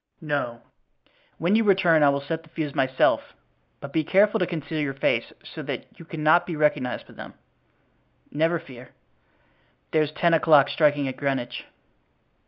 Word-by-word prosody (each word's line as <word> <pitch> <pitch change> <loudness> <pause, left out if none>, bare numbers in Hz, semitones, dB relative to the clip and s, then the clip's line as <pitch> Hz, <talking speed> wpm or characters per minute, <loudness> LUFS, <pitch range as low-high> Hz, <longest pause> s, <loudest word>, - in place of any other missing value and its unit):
"No. 140 -6 -3 0.7
When 175 +5 +1
you 225 - +3
return 180 -6 +4
I 145 - +6
will 140 0 0
set 160 +3 -4
the 160 - -21
fuse 155 -3 -4
myself, 130 -2 +1 0.4
but 140 0 -9
be 160 - +1
careful 205 +6 +3
to 180 - 0
conceal 155 -2 -4
your 135 -2 -3
face, 135 - 0
so - - -9
that - - -5
you 170 - -11
cannot 155 +1 +2
be 170 - -4
recognized 150 -4 0
by - - -17
them." - - -11 1.0
"Never 165 +3 +1
fear." 130 -6 -13 1.0
"There's 155 -2 +1
ten 170 +2 +1
o'clock 150 -3 +5
striking 145 -3 +2
at 130 - -5
Greenwich." 130 -4 -3
155 Hz, 160 wpm, -24 LUFS, 140-165 Hz, 1.0 s, I